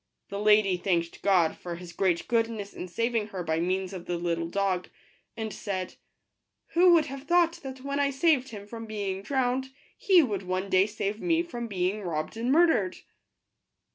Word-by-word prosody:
The 200 - -4
lady 210 -3 +4
thanked 170 -2 -1
God 180 -5 +3
for 175 -1 -6
His 175 0 -10
great 180 -3 0
goodness 225 -3 -1
in 180 - -6
sav 230 +7 -1
ing 215 -2 +1
her 190 -4 -5
by 160 -1 0
means 185 +2 -1
of 180 -2 -8
the 175 - -1
little 170 -1 -1
dog, 185 0 -1 0.5
and 220 -1 -4
said, 185 -3 -4 0.4
" - - -55
Who 355 +1 +6
would 320 -3 +4
have 275 +1 -8
thought 345 0 +3
that 265 -1 -8
when 280 +1 -2
I 285 -1 +3
saved 275 -1 +2
him 205 -2 -8
from 225 +1 -8
being 200 -3 -3
drowned, 260 +2 0 0.3
he 370 -4 +5
would 205 -7 -2
one 185 +1 -3
day 185 +2 +5
save 210 0 -3
me 335 -1 +2
from 240 -9 -6
being 195 0 -1
robbed 155 -3 -3
and 235 +3 -1
mur 335 +5 +6
dered 195 - 0
205 Hz, 195 wpm, -28 LUFS, 185-260 Hz, 0.5 s, Who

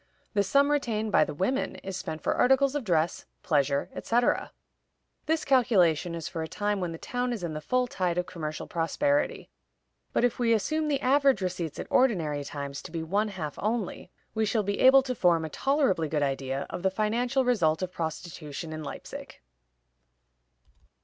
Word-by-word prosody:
The 205 - +3
sum 280 +9 +3
retained 220 -7 0
by - - +5
the - - -4
women 255 - -1
is 195 -1 -5
spent 160 -3 -5
for - - +1
articles 265 +2 +3
of 290 -3 -2
dress, 170 -4 0 0.2
pleasure, 140 -3 +1
etc. 240 +1 +1 0.8
This 320 0 +1
calculation 180 - +3
is 165 -2 -5
for 165 - -4
a 160 - -3
time 205 +4 -1
when 180 -2 -2
the 165 - -6
town 245 +7 -2
is 225 -6 -4
in 165 -2 -3
the 155 - -5
full 250 +10 +1
tide 180 -7 -1
of 180 - 0
commercial 155 -4 -5
prosperity; 285 - 0 0.6
but - - +1
if 245 0 +1
we 235 -2 +3
assume 310 +9 0
the 280 -2 0
average 275 -3 +4
receipts 180 -4 -3
at - - -4
ordinary 165 - +2
times 140 0 -6
to - - -10
be 165 -1 -3
one 200 +6 0
half 165 -8 -5
only, 215 -4 -2 0.2
we 220 - 0
shall 215 0 +1
be 200 +1 -2
able 265 +1 +7
to 255 -1 -2
form 170 -7 +2
a - - -5
tolerably 255 - +1
good 150 -1 0
idea 135 0 -2
of - - -5
the 190 - +2
financial 240 +6 0
result 180 -9 +2
of 180 - -3
prostitution 160 -1 -5
in 155 0 -5
Leipzig. - - -8
190 Hz, 185 wpm, -28 LUFS, 160-250 Hz, 0.8 s, able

